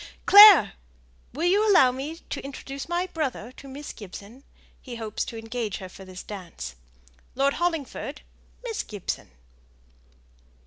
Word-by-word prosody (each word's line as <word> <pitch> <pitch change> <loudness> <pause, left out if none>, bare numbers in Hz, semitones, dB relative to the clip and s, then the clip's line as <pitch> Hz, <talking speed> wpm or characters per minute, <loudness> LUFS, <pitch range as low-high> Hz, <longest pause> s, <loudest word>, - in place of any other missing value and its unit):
Clare! 410 -3 +9 0.6
will 310 +7 -3
you 410 +4 +3
allow 265 -10 +6
me 275 +5 -6 0.2
to - - -4
introduce 275 +1 -8
my 350 +1 0
brother 280 - -4
to 275 - -14
Miss 280 +2 -8
Gibson? 205 +5 -11 0.4
he 250 -3 -9
hopes 220 -2 -4
to 230 - -8
engage 225 -2 -4
her 185 -3 -9
for 190 +1 -13
this 185 -1 -10
dance. 185 - -8 0.6
Lord 275 +2 +2
Hollingford, 330 -5 -3 0.4
Miss 455 -4 -3
Gibson!" 205 -4 -6
270 Hz, 135 wpm, -25 LUFS, 220-330 Hz, 0.6 s, Clare